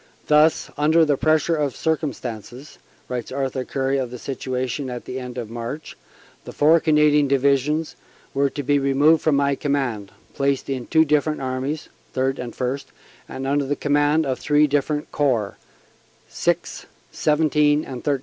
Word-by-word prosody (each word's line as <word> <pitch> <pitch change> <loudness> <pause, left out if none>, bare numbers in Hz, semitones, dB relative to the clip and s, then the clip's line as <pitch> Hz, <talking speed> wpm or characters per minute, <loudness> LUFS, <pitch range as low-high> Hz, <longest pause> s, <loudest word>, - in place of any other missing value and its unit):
"Thus, 150 +1 +3
under 160 +2 +4
the 145 -2 +2
pressure 155 +3 +2
of 145 -4 -1
circum 160 -2 0
stances," 120 +4 -9 0.3
writes 125 -2 -4
Sir 130 - -6
Arthur 130 -1 -2
Currie 135 +1 -1
of 130 -2 -2
the 125 - -7
situation 130 +1 -3
at 125 -1 -6
the 130 - -5
end 125 -1 -7
of 115 -3 -5
March, 120 +6 -6 0.5
"the - - -9
four 155 +3 +4
Canadian 150 -2 +3
Divisions 140 +3 +1 0.4
were 140 0 +2
to 145 - -5
be 145 +1 +2
removed 140 +4 +3
from 155 -3 +2
my 140 0 +2
command, 135 -9 -2 0.2
placed 140 0 -1
in 130 -3 -4
two 160 0 +4
different 150 +1 +1
armies 130 +3 -3 0.3
(Third 135 +1 0
and 120 -2 -6
First), 135 +2 -3 0.4
and 135 - -5
under 140 +1 0
command 145 +2 +2
of 130 -2 -2
three 150 0 +3
different 145 +1 -1
Corps 120 -9 0 0.7
(VI, - - +2 0.6
XVII 150 -1 +2
and 125 -2 -7
XIII). 145 -2 +1
140 Hz, 160 wpm, -22 LUFS, 130-150 Hz, 0.7 s, under